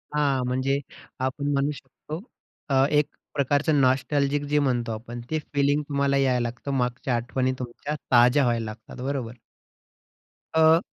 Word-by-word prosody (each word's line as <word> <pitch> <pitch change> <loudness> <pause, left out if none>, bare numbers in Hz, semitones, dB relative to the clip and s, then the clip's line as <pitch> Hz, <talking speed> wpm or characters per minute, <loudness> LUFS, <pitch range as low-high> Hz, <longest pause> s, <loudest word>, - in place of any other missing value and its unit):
हां, 140 -3 +2
म्हणजे 130 +2 0 0.4
आपण 130 +3 -1
म्हणू 140 +1 +1
शकतो 150 +3 -8 0.5
अ, 135 -1 +4
एक 150 -1 +3 0.3
प्रकारचं 145 +1 +2
नोस्टेलजीक 140 +2 +2
जे 150 - +4
म्हणतो 125 -4 0
आपण 120 +2 -6
ते 155 - +1
फिलिंग 145 +1 +2
तुम्हाला 140 -1 +2
यायला 130 -3 +2
लागतं, 125 +4 -6
मागच्या 125 0 -1
आठवणी 130 +2 0
तुमच्या 125 +4 -5 0.2
ताज्या 125 +3 +6
व्हायला 120 -2 +1
लागतात, 110 +3 -9
बरोबर? 130 -4 -3 1.2
अ 160 0 +6
135 Hz, 135 wpm, -25 LUFS, 125-145 Hz, 1.2 s, ताज्या